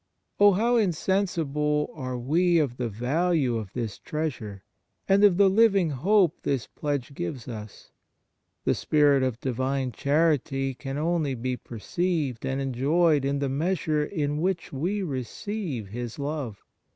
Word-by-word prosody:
Oh, 205 0 +7
how 235 +5 +2
insensible 165 -6 0
are 130 -4 -4
we 170 +8 +2
of 140 -6 0
the 120 -2 -2
value 130 - +1
of 105 -4 -6
this 115 -4 -4
treasure, 120 -11 -4 0.4
and 195 +1 +4
of 195 -4 +6
the 200 0 +6
living 195 -4 +4
hope 180 +5 +2
this 135 -4 -1
pledge 145 -2 -3
gives 120 +2 -5
us! 110 -3 -9 0.7
The - - +2
Spirit 145 -3 +3
of 130 -3 -1
Divine 130 +1 -1
charity 140 -2 +1
can 135 +1 -6
only 155 -3 0
be 125 +2 -2
perceived 140 - -2
and 135 +1 -1
enjoyed 140 +4 +2
in 140 +1 0
the 140 0 -1
measure 155 +1 0
in 150 -3 -2
which 180 -3 -1
we 185 +9 -1
receive 140 - -4
His 120 +2 -6
love. 140 -8 -4
145 Hz, 140 wpm, -26 LUFS, 130-175 Hz, 0.7 s, Oh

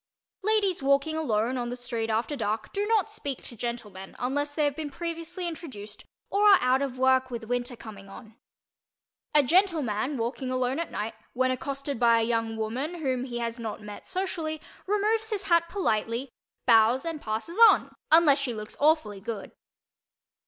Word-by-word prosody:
Ladies 405 -4 +1
walking 280 +3 +2
alone 250 -4 0
on 240 0 -3
the 245 - -3
street 240 -2 -3
after 225 +7 0
dark 215 -3 -3
do 410 +1 -1
not 435 -1 +2
speak 285 - -5
to 235 - -7
gentlemen 215 -5 -6
unless 290 +3 -2
they 305 - +2
have 285 -1 0
been 310 -1 -4
previously 335 +3 -4
introduced 255 - -8 0.3
or 410 0 +6
are - - +2
out 255 +2 +2
of 270 -2 -3
work 260 0 +3
with 235 -2 -5
winter 245 +1 -2
coming 200 -4 -11
on. 220 +2 -12 1.0
A 295 - +7
gentleman 295 - +2
walking 245 +3 -3
alone 255 +2 0
at 335 - -3
night, 220 +2 -4 0.2
when 255 +1 +2
accosted 275 0 -3
by 235 -1 +5
a - - +2
young 225 -1 -1
woman 250 +10 -3
whom 260 -6 -1
he 240 -2 -5
has 235 0 -3
not 225 -2 -5
met 210 0 -9
socially, 335 -5 -3 0.3
removes 430 +2 +1
his 420 -4 -2
hat 335 -1 +3
politely, 235 - -1 0.3
bows 230 +3 +5
and 325 -3 -4
passes 225 - -4
on, - - +1 0.2
unless 310 -3 +6
she 255 -4 -2
looks 215 0 -7
awfully 295 -10 +2
good. 215 0 -6
260 Hz, 175 wpm, -27 LUFS, 230-320 Hz, 1.0 s, A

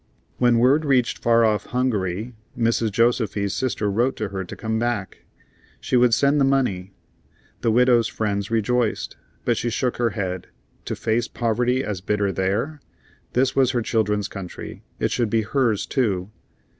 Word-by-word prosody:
When 120 -1 +4
word 130 +6 +4
reached 130 -5 +1
far 115 -1 +4
off 105 -2 0
Hungary, 110 -3 -1 0.2
Mrs. 115 -1 +1
Josefy's 110 -3 +1
sister 125 -5 -1
wrote 120 +6 +1
to 105 - -3
her 95 -1 -4
to 90 - -9
come 110 0 -2
back; 120 -5 -3 0.5
she - - -2
would 120 -2 +5
send 140 +1 +3
the - - +5
money. 125 -9 +1 0.7
The - - +1
widow's 120 0 +4
friends 100 -2 -2
rejoiced, 115 +1 0 0.3
but 120 -2 +2
she 120 - -1
shook 125 +2 -1
her 120 -1 +2
head. 90 -3 -3 0.4
To - - -3
face 115 +2 0
poverty 125 +2 0
as 100 -6 -4
bitter 100 0 0
there? 105 +12 -1 0.5
This 130 +1 +2
was 130 -2 +4
her 120 -2 0
children's 105 -3 0
country; 95 -3 -8 0.2
it - - -1
should 120 -3 0
be 110 +1 +1
hers 115 -2 0
too. 100 -7 -1
115 Hz, 160 wpm, -23 LUFS, 105-125 Hz, 0.7 s, would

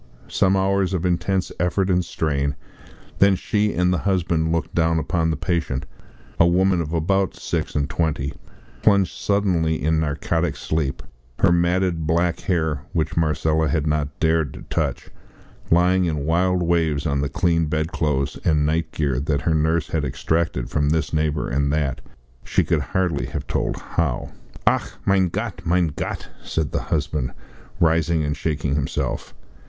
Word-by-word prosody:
Some 95 0 +2
hours 95 0 +1
of 90 0 -2
intense 90 +2 0
effort 90 +2 +1
and 90 0 +2
strain; 70 -4 -1 0.6
then 100 -1 +6
she 105 +2 0
and 90 +1 +2
the 90 - 0
husband 85 -4 +1
looked 85 -1 -1
down 80 0 +2
upon 80 +1 0
the 80 - -1
patient, 80 -6 -1 0.5
a 85 - +6
woman 90 0 +3
of 80 -2 -4
about 95 +4 +1
six - - -3
and 70 -1 +1
twenty, 75 -3 -1 0.5
plunged 100 -8 +3
suddenly 90 -7 +1
in 80 +4 +1
narcotic 80 +3 -1
sleep, 75 -4 -2 0.3
her - - +4
matted 85 -1 +1
black 85 +1 +1
hair, 80 -6 0
which 80 0 -1
Marcella 80 0 +1
had 75 +1 0
not 75 -1 -1
dared 80 -3 +1
to - - -9
touch, - - -2 0.6
lying 90 +2 +4
in 75 -4 -1
wild 90 +2 +2
waves 80 -4 +1
on 70 -2 +1
the 70 - -1
clean 85 +1 +1
bed 80 +2 -1
clothes 70 -3 -1
and 75 -2 +2
night 80 0 0
gear 70 -5 0
that 70 +1 0
her 80 - +1
nurse 80 +2 +1
had 80 -3 -1
extracted 75 -1 -1
from 75 0 +1
this 80 -1 0
neighbour 75 -1 0
and 70 +3 0
that 75 -4 -1 0.4
she - - +1
could - - +1
hardly 90 -6 -1
have - - -5
told - - -1
how. 75 -8 -2 0.3
"Ach, - - +2
mein 95 -2 +3
Gott, 100 -3 -4
mein 85 0 +2
Gott!" - - -4 0.2
said 80 -2 -2
the - - -1
husband, 75 -4 -2 0.5
rising 80 -1 +2
and 75 0 -1
shaking 75 -4 -1
himself. 70 -1 -2
80 Hz, 160 wpm, -22 LUFS, 75-90 Hz, 0.6 s, then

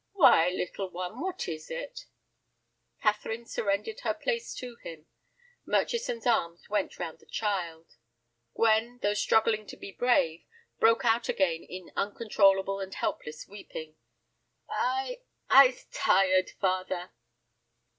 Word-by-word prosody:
"Why, 230 - +6
little 185 +1 -3
one, 180 +6 -6
what 370 +1 -3
is 155 -2 -6
it?" - - -7 1.0
Catherine 220 +2 0
surrendered 210 - -2
her - - -1
place 470 -1 -2
to 245 -2 -8
him. 160 -6 -10 0.6
Murchison's 465 - -1
arms 170 -8 0
went 205 -1 -1
round 165 -3 -5
the - - -23
child. 175 -6 -3 0.6
Gwen, 230 +2 +2
though 205 0 +2
struggling 215 0 +2
to - - -9
be 200 - -9
brave, 175 -9 +1 0.4
broke 230 +2 +4
out 230 +1 +2
again 170 -4 +1
into 185 -1 -10
uncontrollable 195 -3 +2
and 190 -1 -6
helpless 150 0 -4
weeping. 160 -6 -9 0.8
"I—I's 265 - +2
tired, 185 -1 +3
father." 185 -1 -1
205 Hz, 115 wpm, -29 LUFS, 185-240 Hz, 1.0 s, Why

